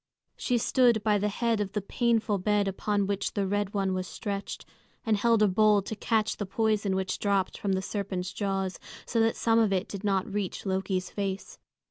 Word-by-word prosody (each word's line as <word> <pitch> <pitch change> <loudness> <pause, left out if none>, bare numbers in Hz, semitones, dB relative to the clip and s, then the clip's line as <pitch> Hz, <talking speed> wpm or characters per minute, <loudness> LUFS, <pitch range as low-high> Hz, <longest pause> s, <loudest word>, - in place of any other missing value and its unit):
She 245 - 0
stood 235 -2 +3
by 210 -1 +3
the 205 - +1
head 225 +1 0
of 200 -1 -3
the 210 - 0
painful 225 0 +1
bed 205 +1 +1
upon 200 +1 0
which 200 0 -2
the 200 - +1
Red 205 +1 -1
One 195 -1 +1
was 185 0 -2
stretched, 200 -1 -5 0.4
and 220 -2 +3
held 225 +1 +3
a - - +5
bowl 210 +1 +4
to 220 - -5
catch 220 0 0
the 205 - -3
poison 215 -2 +1
which 190 0 -2
dropped 200 -2 +1
from 200 -2 0
the 190 0 -1
serpent's 190 -2 -3
jaws, 195 -2 -2 0.3
so 230 - -1
that 225 0 +3
some 225 0 +3
of 220 -3 +3
it 195 +2 0
did 200 0 -7
not 195 -2 +1
reach 205 -1 -4
Loki's 190 -1 -1
face. 195 -1 -4
205 Hz, 200 wpm, -28 LUFS, 195-215 Hz, 0.4 s, a